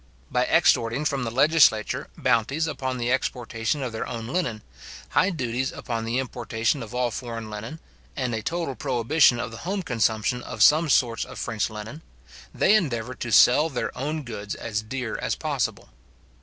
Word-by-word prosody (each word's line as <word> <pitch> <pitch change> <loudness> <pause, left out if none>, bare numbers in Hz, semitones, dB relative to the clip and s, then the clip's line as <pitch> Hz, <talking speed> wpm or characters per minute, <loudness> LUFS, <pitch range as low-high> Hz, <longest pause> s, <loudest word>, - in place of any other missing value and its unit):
By - - +1
extorting 115 +6 +3
from 140 -4 0
the - - -2
legislature 130 -4 +3
bounties 135 +8 +1
upon 130 -5 -3
the 120 0 -1
exportation 125 +1 -1
of 125 - -3
their 110 - -4
own 115 -2 -5
linen, 120 -7 -2 0.5
high 185 - +3
duties 130 -6 -2
upon 115 -2 -4
the 115 +2 -1
importation 120 0 -1
of 115 +1 -8
all 125 -1 0
foreign 115 -1 -6
linen, 110 +9 -7 0.4
and 125 -3 -2
a 110 - -2
total 165 +2 -2
prohibition 130 0 +3
of 125 -1 -4
the 115 - -8
home 190 - -3
consumption 115 -2 0
of - - 0
some 155 +1 +5
sorts 120 -4 +2
of - - -10
French 110 -2 -2
linen, 110 +8 -8 0.5
they 205 - +3
endeavour 130 - +1
to 120 -1 -5
sell 135 +8 +6
their 120 -5 -3
own 150 +4 -3
goods 105 -5 -6
as 105 -2 -3
dear 115 +1 -4
as - - -1
possible. - - -2
125 Hz, 170 wpm, -25 LUFS, 115-140 Hz, 0.5 s, sell